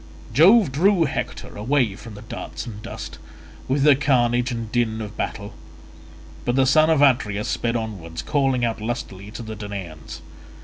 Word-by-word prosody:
Jove 185 - +6
drew 175 +5 +3
Hector 140 - -4
away 115 -1 +1
from 110 0 -11
the 105 - -10
darts 110 - -7
and 105 -3 -8
dust, - - -8 0.5
with 135 +1 +1
the 145 -2 +7
carnage 125 -3 +2
and 115 -2 -5
din 115 -2 0
of 105 -1 -6
battle; 105 -1 -4 0.9
but 120 - 0
the 135 0 +4
son 155 +4 +5
of 155 -3 +4
Atreus 110 -7 +2
sped 120 0 -1
onwards, 95 -8 -5
calling 135 -5 +1
out 115 -2 -2
lustily 105 -4 -5
to 115 +2 -8
the 110 -1 -6
Danaans. 90 -6 -7
120 Hz, 165 wpm, -23 LUFS, 105-135 Hz, 0.9 s, the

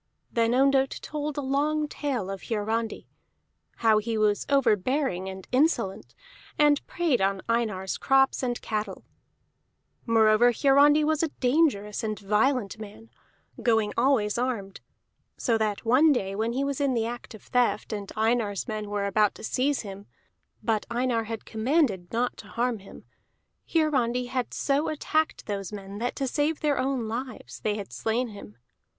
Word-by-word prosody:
Then 230 +1 +2
Ondott 270 0 +3
told 300 -1 -4
a - - 0
long 295 +3 0
tale 255 -10 -3
of 195 - -6
Hiarandi, 225 +1 -2 0.8
how 215 -1 +6
he 225 +1 -2
was 210 -1 +1
overbearing 250 -5 +1
and 190 -1 -9
insolent, 255 - 0 0.4
and 295 -1 +4
preyed 325 - +1
on 195 0 0
Einar's 215 -5 -1
crops 270 0 +3
and 245 -2 -1
cattle. 210 -3 -4 1.0
Moreover 225 +1 +5
Hiarandi 285 +4 +5
was 310 0 +1
a 330 - +2
dangerous 245 -6 +1
and 215 -1 -2
violent 215 +2 +1
man, 220 +1 -11 0.5
going 225 -3 +2
always 235 -4 +2
armed, 230 -6 -3 0.6
so 235 - +1
that 215 0 -1
one 265 +7 +5
day 195 -8 0
when 225 +3 -1
he 270 +3 0
was 280 0 -2
in 275 -3 +1
the 225 -1 +1
act 240 -1 -6
of 215 - -14
theft 235 -3 0
and 205 -2 -5
Einar's 220 -2 0
men 215 -2 -4
were 205 -1 -1
about 210 +1 +2
to - - -12
seize 270 +5 0
him 200 -1 -9 0.6
but 220 -2 0
Einar 235 -1 0
had 225 0 -6
commanded 220 - 0
not 240 +2 -1
to - - -11
harm 240 -1 -1
him 195 - -14 0.6
Hiarandi 250 -6 +1
had 250 -2 -2
so 285 +2 0
attacked 310 +1 -1
those 200 -3 -4
men 200 0 -7
that 245 +2 -2
to 275 - -2
save 295 +4 0
their 295 -2 +1
own 260 -3 -1
lives 250 +4 -6
they 210 -1 -1
had 205 -2 -7
slain 235 +2 -1
him. 200 - -11
235 Hz, 155 wpm, -27 LUFS, 210-270 Hz, 1.0 s, how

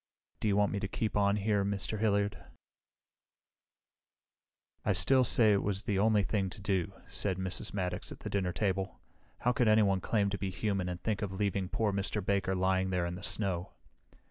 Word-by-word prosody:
"Do - - -1
you 100 -1 +2
want 105 0 +3
me 100 - -2
to 100 - -3
keep 110 +3 -3
on 100 0 +3
here, 105 -1 +1
Mr. 100 +1 -1
Hilliard?" 100 -1 0 2.4
"I 105 - +2
still 125 +9 +5
say 110 -2 +5
it 100 - +2
was 100 0 -1
the 100 -2 0
only 105 0 +3
thing 95 -2 -1
to 100 - -10
do," 95 -3 -1
said 95 -3 0
Mrs. 95 +3 -1
Maddox 90 -3 -3
at - - -10
the - - -5
dinner 95 -3 0
table. 95 0 -2 0.4
"How 125 - +3
could 120 -1 +1
anyone 105 -3 +4
claim 100 -1 +1
to 100 - -3
be 95 - -2
human 95 -1 -2
and 90 0 -5
think 105 -3 -1
of 100 -3 -3
leaving 95 -1 -1
poor 105 -3 0
Mr. 100 0 -2
Baker 95 -1 +1
lying 95 0 +1
there 90 -2 0
in 85 - -3
the 90 - -7
snow?" 95 -3 -1
100 Hz, 195 wpm, -31 LUFS, 95-105 Hz, 2.4 s, still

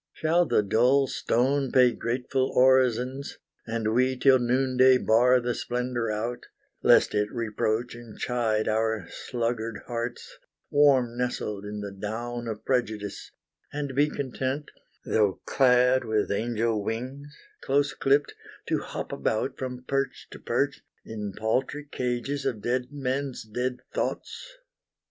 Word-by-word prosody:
Shall 170 +2 +2
the 105 - +3
dull 125 +7 +3
stone 135 +2 0
pay 125 -1 +5
grateful 125 +3 -1
orisons, 130 +1 +3 0.3
And 115 -1 -1
we 130 +2 +2
till 130 0 +5
noonday 130 +1 +4
bar 125 +2 +4
the 120 0 -1
splendor 120 -2 -2
out, 115 +3 -3 0.3
Lest - - +5
it 105 0 0
reproach 115 0 -1
and 120 -2 -11
chide 115 -3 0
our 110 -3 0
sluggard 115 -2 -3
hearts, 120 0 -5 0.3
Warm 135 -5 +4
nestled 105 -5 -2
in 105 0 -5
the 100 -1 -5
down 115 +4 -5
of 110 -2 -6
Prejudice, 110 -6 -2 0.4
And 145 -2 -4
be 145 +3 +3
content, 135 +1 -3 0.3
though 105 -3 +1
clad 125 -1 +4
with 110 -1 0
angel 115 0 0
wings, 135 +7 -5 0.3
Close 140 0 +1
clipped, 140 +2 +2 0.4
to - - +1
hop - - -6
about 110 +5 -1
from 125 -1 -5
perch 135 +1 -2
to - - -10
perch, - - -1 0.2
In 105 -2 -5
paltry 130 +6 -1
cages 125 +3 -2
of 115 -6 -2
dead 125 +1 0
men's 135 -1 -3
dead 125 +3 -3 0.2
thoughts? - - -4
125 Hz, 130 wpm, -27 LUFS, 110-130 Hz, 0.4 s, pay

